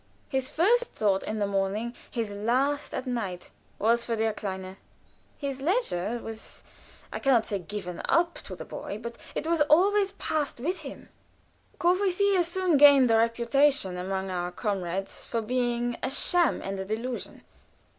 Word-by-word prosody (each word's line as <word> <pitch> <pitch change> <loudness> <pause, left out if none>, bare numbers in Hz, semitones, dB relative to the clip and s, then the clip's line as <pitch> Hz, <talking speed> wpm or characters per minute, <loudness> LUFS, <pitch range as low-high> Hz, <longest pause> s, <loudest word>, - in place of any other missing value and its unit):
His 265 -1 -1
first 465 +9 +3
thought 200 - 0
in 215 - -4
the 205 - +1
morning, 200 +4 -1 0.2
his 230 -4 -3
last 255 +8 0
at - - -3
night, 210 -8 -4 0.3
was 235 +3 +2
for 230 - -1
der 220 0 0
Kleine. 190 -2 -5 0.6
His 275 -2 -4
leisure 270 - 0
was 225 0 -8 0.5
I - - -3
can 270 -1 +3
not 230 -3 +3
say 200 - -2
"given 180 -1 -6
up" 340 0 +3
to - - -7
the - - -8
boy 200 - -6
but 235 +1 -6 0.2
it - - -2
was 330 -1 +1
always 395 +5 +4
passed 300 -5 -2
with 345 +8 -2
him. 280 -4 -9 0.7
Courvoisier 375 +2 +3
soon 345 -1 +1
gained 275 -4 +7
a 225 - +5
reputation 235 -1 +2
among 190 +1 -3
our 175 -1 -2
comrades 190 -2 -3
for 230 - -1
being 240 +1 -1
a 255 - -1
sham 340 +4 +2
and 195 0 -4
a 190 - -3
delusion. 230 +5 -5
235 Hz, 160 wpm, -27 LUFS, 205-295 Hz, 0.7 s, gained